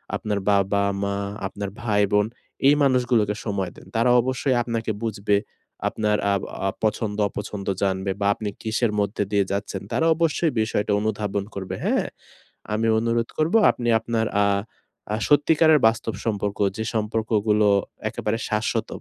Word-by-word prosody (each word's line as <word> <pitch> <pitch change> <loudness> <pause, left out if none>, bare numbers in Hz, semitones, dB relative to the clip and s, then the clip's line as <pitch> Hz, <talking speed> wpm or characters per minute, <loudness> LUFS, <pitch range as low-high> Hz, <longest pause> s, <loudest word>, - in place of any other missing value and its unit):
আপনার 105 -1 -2
বাবা-মা, 100 0 +1 0.3
আপনার 100 +1 -5
ভাই-বোন 105 -2 +2 0.4
এই 145 - +7
মানুষগুলোকে 125 -6 +2
সময় 100 -4 -2
দেন। - - -14
তারা 115 +2 +3
অবশ্যই 130 +1 0
আপনাকে 115 -1 -2
বুঝবে। 100 -1 +1 0.5
আপনার 105 -1 0 0.2
আব 100 - 0 0.3
আ - - +2
পছন্দ-অপছন্দ 105 -2 -2
জানবে 95 0 0
বা 100 - +2
আপনি 105 -2 -4
কিসের 115 +1 0
মধ্যে 100 +1 0
দিয়ে 100 -1 +2
যাচ্ছেন 100 -1 -3
তারা 160 - +1
অবশ্যই 165 0 +1
বিষয়টা 110 -1 -1
অনুধাবন 105 -2 -1
করবে; 95 -1 -4
হ্যাঁ? - - +1 0.7
আমি 110 +1 +1
অনুরোধ 115 +1 0
করব 155 +4 +1 0.2
আপনি 120 -1 -3
আপনার 115 0 -1 0.2
আ - - +3 0.7
আ - - +1
সত্যিকারের 155 +1 +5
বাস্তব 115 0 +1
সম্পর্ক, 105 -2 -2 0.2
যে 110 - -2
সম্পর্কগুলো 110 -1 +1 0.4
একেবারে 110 +2 -2
শাশ্বত, 110 0 -1
105 Hz, 135 wpm, -24 LUFS, 100-115 Hz, 0.7 s, এই